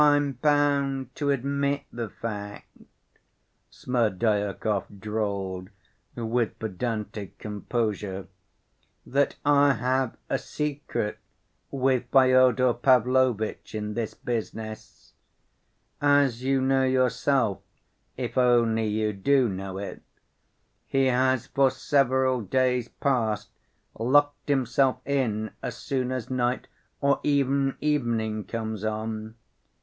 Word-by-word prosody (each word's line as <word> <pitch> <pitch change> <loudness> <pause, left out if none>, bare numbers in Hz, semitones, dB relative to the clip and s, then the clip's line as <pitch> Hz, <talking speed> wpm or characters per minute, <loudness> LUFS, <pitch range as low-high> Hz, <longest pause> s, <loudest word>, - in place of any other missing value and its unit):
"I'm 145 -1 +4
bound 140 -1 +1
to 145 -1 0
admit 140 +1 0
the 115 -2 -4
fact," 105 -1 -6 1.0
Smerdyakov 105 -3 -1
drawled 100 -3 -3 0.5
with 115 0 -1
pedantic 105 -1 -4
composure, 105 -2 -3 0.8
"that 140 +2 +1
I 145 -1 +5
have 130 +1 0
a - - 0
secret 145 -7 -3 0.5
with 130 -2 +1
Fyodor 130 -1 +5
Pavlovitch 125 -3 +2
in 105 0 -3
this 115 -1 -3
business. 110 -2 -6 0.9
As 145 -4 +3
you 135 0 +2
know 135 0 +2
yourself 130 -3 +2 0.6
(if 125 -1 -2
only 115 -3 +3
you 105 0 0
do 130 +6 +3
know 95 -1 -5
it) 100 0 -6 0.9
he 135 0 +2
has 130 -1 +2
for 135 -1 +3
several 130 -2 +2
days 125 +3 +1
past 115 -6 -1 0.5
locked 145 +5 +2
himself 130 -1 +2
in 115 -6 -1
as - - -5
soon 130 -2 -2
as 130 -1 -4
night 125 0 0 0.3
or 140 0 +3
even 140 -1 +1
evening 115 -8 0
comes 110 -1 -4
on. 110 0 -3
125 Hz, 100 wpm, -26 LUFS, 110-135 Hz, 1.0 s, I